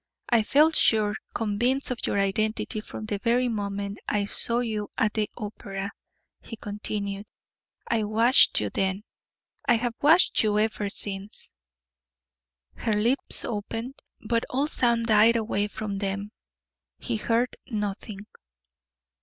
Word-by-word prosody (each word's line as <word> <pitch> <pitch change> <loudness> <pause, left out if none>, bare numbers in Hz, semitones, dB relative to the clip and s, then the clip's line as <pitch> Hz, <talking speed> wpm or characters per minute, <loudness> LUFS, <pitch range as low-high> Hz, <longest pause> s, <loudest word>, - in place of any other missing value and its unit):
"I 235 -2 +4
felt 300 +8 +4
sure 210 -2 +4 0.2
convinced 240 +5 0
of 245 - -3
your - - 0
identity 215 +2 0
from 215 - -8
the 205 -2 -3
very 245 +3 +2
moment 200 -2 -3
I 205 -1 0
saw 230 +3 -1
you 220 -4 -2
at 215 -2 +1
the 215 -2 -1
opera," 200 -2 -6 0.5
he 225 - -9
continued. 205 -1 -5 0.6
"I 225 -2 +1
watched 225 +5 +5
you 105 -2 -2
then; 190 +1 -1 0.6
I 240 - +5
have 235 +1 -1
watched 320 +5 +5
you 210 -1 +1
ever 215 -1 0
since." 200 0 -3 1.2
Her 220 - -2
white 210 0 +1
lips 255 +4 +4
opened, 225 +4 -5 0.3
but 230 0 +1
all 270 +3 +1
sound 235 -5 +1
died 220 +1 +5
away 215 -2 0
from 205 -1 -5
them 200 +1 -3 0.7
he 235 -3 -2
heard 235 +3 0
nothing. 210 -2 -4
215 Hz, 135 wpm, -26 LUFS, 205-235 Hz, 1.2 s, watched